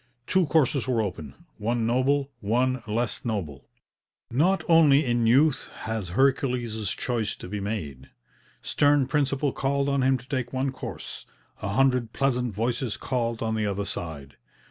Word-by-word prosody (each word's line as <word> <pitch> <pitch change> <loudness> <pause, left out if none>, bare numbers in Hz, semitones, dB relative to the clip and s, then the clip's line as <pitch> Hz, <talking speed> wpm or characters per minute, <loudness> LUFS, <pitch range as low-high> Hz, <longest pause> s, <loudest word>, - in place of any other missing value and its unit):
Two 185 +2 +2
courses 140 -3 +2
were 125 -3 +1
open, 80 -10 -4 0.2
one 115 +2 0
noble, 135 +4 +1
one 125 +4 +1
less 115 +2 -1
noble. 85 - -4 0.6
Not 175 +10 +2
only 155 -4 +6
in 120 -2 +1
youth 135 +5 +3
has 110 -5 -3
Hercules' 125 -6 +1
Choice 115 -3 -2
to - - -9
be 105 +3 -4
made. 80 - -5 0.5
Stern 145 -1 +3
principle 140 0 0
called 140 +1 0
on 140 -1 +1
him 130 0 +3
to 125 +1 -15
take 130 -3 -3
one 130 +1 0
course, 130 - -8 0.3
a - - -3
hundred 125 +1 +2
pleasant 125 -5 0
voices 115 +2 -1
called 115 -3 -2
on 110 0 -1
the 110 -1 0
other 100 0 -2
side. 75 -7 -6
125 Hz, 150 wpm, -26 LUFS, 110-135 Hz, 0.6 s, only